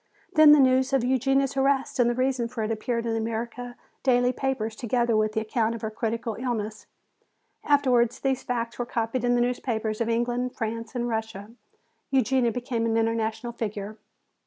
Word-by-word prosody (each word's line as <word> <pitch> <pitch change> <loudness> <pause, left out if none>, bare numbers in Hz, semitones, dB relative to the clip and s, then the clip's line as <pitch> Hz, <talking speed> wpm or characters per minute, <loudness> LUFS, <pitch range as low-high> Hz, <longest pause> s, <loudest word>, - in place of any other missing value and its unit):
Then 310 -1 +8
the 300 - +8
news 260 0 +3
of 270 -3 +3
Eugenia's 270 +2 +1
arrest 270 0 +1
and 240 -1 +4
the 240 - 0
reason 255 -1 0
for 230 -1 -4
it 215 - -2
appeared 230 +1 -2
in 230 - -1
the 225 - 0
American 235 +2 -4 0.3
daily 250 -1 +3
papers 235 -5 -2
together 235 0 0
with 215 0 +1
the 220 - 0
account 225 +1 0
of 230 - -8
her 220 - -2
critical 225 +1 -2
illness. 220 -4 -3 0.8
Afterwards 255 -5 +3
these 265 -2 0
facts 235 -1 -3
were 245 - -1
copied 230 +1 -2
in 245 0 +3
the 240 - +2
newspapers 230 -3 -1
of 230 - 0
England, 240 +2 -1
France 230 +1 -4
and 240 0 -1
Russia. 220 -2 -4 0.6
Eugenia 260 -2 +2
became 235 -1 -2
an 225 0 +1
international 225 +1 -1
figure. 215 -2 -5
235 Hz, 180 wpm, -26 LUFS, 225-255 Hz, 0.8 s, Then